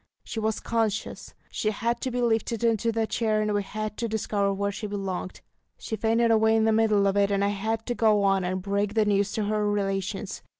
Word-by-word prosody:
She 225 - -5
was 220 0 -1
conscious; 220 -2 -2 0.2
she 215 - -1
had 230 +3 -2
to 260 - -1
be 245 0 -1
lifted 230 0 0
into 230 0 +2
the 225 0 0
chair, 220 -1 0
and 210 0 0
we 205 - +1
had 215 +2 -5
to 230 - -2
discover 205 -2 0
where 200 +1 -1
she 210 +1 -5
belonged; 195 -2 -4 0.4
she 220 - -4
fainted 230 +1 +2
away 220 0 +4
in 220 - +3
the 220 - +3
middle 215 -2 +3
of 195 0 +2
it, 200 0 +3
and 200 0 +1
I - - +2
had 220 +2 -2
to 245 - -1
go 215 -3 +3
on 195 -1 +2
and 185 +1 -2
break 200 +1 -1
the 220 -1 +3
news 205 0 +1
to 215 - -1
her 210 0 0
relations. 195 -1 -2
215 Hz, 225 wpm, -26 LUFS, 200-225 Hz, 0.4 s, away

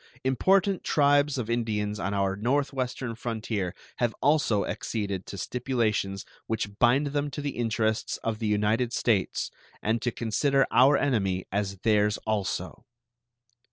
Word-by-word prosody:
Important 190 - +2
tribes 145 -1 +3
of 120 -4 -2
Indians 105 -3 -1
on 100 - -2
our 100 -1 0
northwestern 130 +1 -1
frontier 110 -5 -3 0.2
have 120 -3 0
also 145 -9 +2
acceded 100 -4 -3
to 100 - -7
stipulations 110 -5 -1 0.2
which 105 -2 -3
bind 125 +5 +4
them 145 0 0
to 140 - -7
the 145 -1 -2
interests 110 -2 -1
of 110 -1 -2
the 110 - -1
United 105 +4 +1
States 105 -7 0 0.3
and 110 +2 0
to 120 - 0
consider 135 +5 +1
our 135 +4 +6
enemy 95 -9 0
as 100 0 -1
theirs 105 -2 +3
also. 105 -3 -2
115 Hz, 135 wpm, -27 LUFS, 105-130 Hz, 0.3 s, our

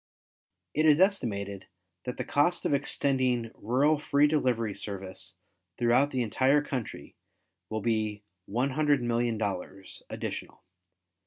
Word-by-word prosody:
It 155 +1 +3
is 150 0 +6
estimated 100 - 0 0.4
that 125 - -4
the - - -2
cost 170 +4 +1
of - - +2
extending 130 -4 +1
rural 140 +7 +2
free 145 -1 +3
delivery 125 -8 +1
service 95 -1 -6 0.4
throughout 125 +4 +3
the 130 -3 0
entire 130 +6 +3
country 130 -6 -5 0.5
will 110 0 -2
be 110 -3 -1 0.3
$100,000,000, 120 -7 -1
additional. - - -6
125 Hz, 105 wpm, -29 LUFS, 110-145 Hz, 0.5 s, is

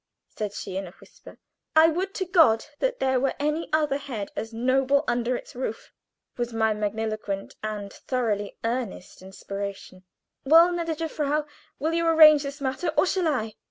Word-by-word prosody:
she 210 -1 -2
said 195 -1 -7
in 195 -1 -4
a - - -11
whisper. - - -16 0.4
"I 320 +1 +7
would 375 +5 -3
to 375 - -1
God 325 - +4
that - - 0
there 260 -1 +2
were 270 +1 0
any 300 +3 -1
other 300 -3 +2
head 240 -8 -6
as 225 - -4
noble 260 +4 +2
under 240 +1 0
its - - -8
roof!" 245 -3 -5 0.5
was 240 -1 -2
my 220 -1 +1
magniloquent 210 -1 -3
and 210 -2 -5
thoroughly 215 -6 -2
earnest 230 -7 -4
inspiration. 195 0 -7 0.4
"Well, 330 +5 +7
gnädige 330 -2 -2
Frau, 300 -1 -1 0.3
will 315 +4 -1
you 335 0 +1
arrange 310 -2 +8
this 280 0 -6
matter, 270 +5 -2
or 300 - +5
shall 370 -2 0
I?" 225 -8 -1
260 Hz, 165 wpm, -25 LUFS, 215-310 Hz, 0.5 s, arrange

